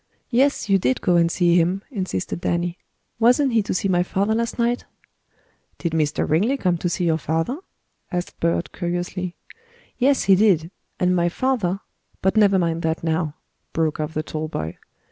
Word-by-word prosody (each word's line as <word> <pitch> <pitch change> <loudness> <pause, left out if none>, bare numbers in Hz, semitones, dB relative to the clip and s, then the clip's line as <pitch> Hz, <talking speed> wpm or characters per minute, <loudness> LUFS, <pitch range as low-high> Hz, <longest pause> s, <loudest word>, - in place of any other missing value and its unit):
"Yes, 270 +1 +2
you 195 -1 +4
did 130 -6 +1
go 180 - +2
and 170 0 +3
see 175 -1 +3
him," 180 +4 +1
insisted 185 - -3
Danny. 175 0 -1 0.4
"Wasn't 250 +3 +4
he 225 - +4
to 205 - -4
see 185 - 0
my 180 -2 +3
father 195 +4 0
last 230 +1 -1
night?" 240 +1 0 0.9
"Did 170 - -2
Mr. 155 -2 0
Ringley 210 - +2
come 180 -8 +1
to 175 - -1
see 175 +1 -1
your 160 -1 +2
father?" 165 - -1 0.5
asked 175 -1 -4
Bert 170 +1 0
curiously. 175 0 -3 0.6
"Yes, 270 +2 +3
he 195 - +5
did. 185 -5 +3 0.3
And 180 0 +2
my 175 -1 +2
father 200 -4 0 0.4
but 190 +2 +1
never 200 -3 +5
mind 165 -2 0
that 160 0 -1
now," 160 -2 -1 0.4
broke 160 -2 0
off 155 +1 -3
the 155 - -1
tall 155 0 -4
boy. 80 - -5
175 Hz, 175 wpm, -22 LUFS, 165-205 Hz, 0.9 s, he